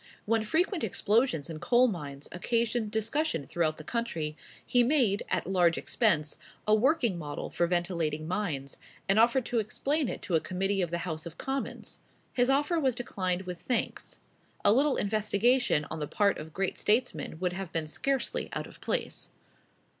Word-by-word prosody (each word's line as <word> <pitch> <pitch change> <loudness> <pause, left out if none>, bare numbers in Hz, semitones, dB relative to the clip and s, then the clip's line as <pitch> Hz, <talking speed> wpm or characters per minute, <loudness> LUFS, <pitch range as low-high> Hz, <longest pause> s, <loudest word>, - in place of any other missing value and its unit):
When 225 0 +2
frequent 355 - +1
explosions 215 - +1
in 160 -2 -6
coal 245 +8 +4
mines 145 - -5
occasioned 230 +4 0
discussion 220 - -1
throughout 155 -1 0
the 155 - -8
country, 165 -9 -2 0.3
he 245 - +3
made, 240 -6 +3
at - - 0
large 175 -3 +3
expense, 155 -10 +1 0.3
a 215 - +5
working 235 - +3
model 145 -2 -5
for 170 - +1
ventilating 170 -3 -1
mines, 160 -8 -2 0.3
and 195 +3 +4
offered 235 +2 +4
to 240 - 0
explain 275 +7 0
it - - -5
to 180 - -4
a 165 - +5
committee 195 +3 -1
of 175 - 0
the 170 - -1
House 160 -1 -4
of 165 - -10
Commons. 270 0 -4 0.3
His 245 0 +3
offer 295 +5 +2
was 265 -5 +2
declined 185 -6 -2
with 180 -2 -6
thanks. 245 -3 -2 0.5
A 205 - +7
little 275 +3 +3
investigation 215 - +2
on 160 - -3
the 150 - -2
part 200 +4 +2
of 155 +1 -8
great 190 +3 -2
statesmen 225 -6 0
would 180 -1 0
have 190 -2 -5
been 165 -1 -1
scarcely 265 - -1
out - - -3
of - - -13
place. - - -2
200 Hz, 170 wpm, -29 LUFS, 170-245 Hz, 0.5 s, A